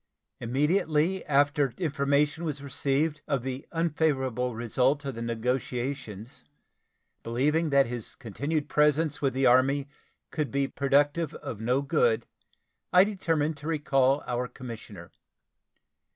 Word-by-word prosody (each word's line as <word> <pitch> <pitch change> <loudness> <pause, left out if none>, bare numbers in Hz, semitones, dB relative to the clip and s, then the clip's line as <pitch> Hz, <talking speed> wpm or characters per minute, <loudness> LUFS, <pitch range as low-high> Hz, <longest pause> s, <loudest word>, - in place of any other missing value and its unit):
Immediately 155 +7 +1
after 145 -2 +2
information 145 -1 +1
was 145 -3 -4
received 140 +2 -1
of 140 -5 -1
the 130 +1 -5
unfavorable 135 -7 0
result 130 +5 +1
of 135 - -3
the 115 - -7
negotiations, 120 -1 -3 0.8
believing 150 +8 +1
that 140 -1 +4
his 120 -2 -6
continued 145 - -3
presence 150 0 +2
with 135 -2 0
the 135 0 +2
Army 135 +3 +4 0.4
could 150 -3 -2
be 140 0 0
productive 145 +4 +1
of 105 - -7
no 125 +5 +1
good, 470 - +2 0.7
I 180 0 +7
determined 165 -7 -1
to 145 +2 -8
recall 140 -3 +2
our 125 0 -2
commissioner. 110 -9 -10
140 Hz, 120 wpm, -28 LUFS, 125-150 Hz, 0.8 s, I